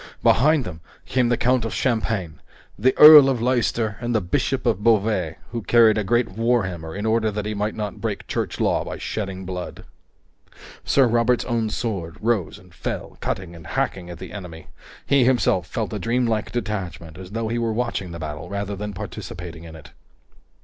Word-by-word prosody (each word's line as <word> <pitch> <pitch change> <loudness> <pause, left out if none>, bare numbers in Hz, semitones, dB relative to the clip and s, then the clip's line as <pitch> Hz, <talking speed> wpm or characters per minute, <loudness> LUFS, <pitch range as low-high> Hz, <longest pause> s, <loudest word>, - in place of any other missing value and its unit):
Behind 150 +3 +4
them 80 -4 -8 0.2
came 125 -2 +1
the 120 - +2
Count 125 -1 +2
of 115 - -4
Champagne, 110 - -1 0.4
the 130 +5 +1
Earl 150 -2 +10
of 130 -3 0
Leister, 115 -3 0
and 120 0 -1
the - - +4
Bishop 90 -3 -1
of 105 - +1
Beauvais, 105 -7 +2 0.2
who 115 -1 -3
carried 110 -1 +5
a - - -1
great 120 +4 +2
warhammer 95 -9 -1
in 105 - -3
order 110 0 +2
that 105 0 -4
he 105 - -2
might 105 +1 -2
not 105 -2 -5
break - - -3
Church - - -3
Law - - +1
by - - -6
shedding 95 -3 -4
blood. 90 -1 -6 1.0
Sir 135 - +4
Robert's 120 +1 +2
own 115 -3 -1
sword 100 -8 -4
rose 110 -7 -1
and - - -19
fell, - - -5
cutting 90 -2 -4
and 80 -3 -12
hacking 90 +4 -2
at 85 - -8
the - - -9
enemy. 90 -6 -8 0.4
He 140 -2 +4
himself 120 -8 +2
felt 110 +2 -3
a 105 - -3
dreamlike 115 -2 0
detachment, 95 -8 -4
as 95 -1 -9
though 115 -1 -2
he 120 +1 -1
were 115 -1 0
watching 115 -5 -2
the 85 - -7
battle 80 +1 -6
rather 100 0 -3
than 105 +1 -5
participating 90 -4 -8
in 80 -1 -10
it. 80 - -13
110 Hz, 185 wpm, -23 LUFS, 90-120 Hz, 1.0 s, Earl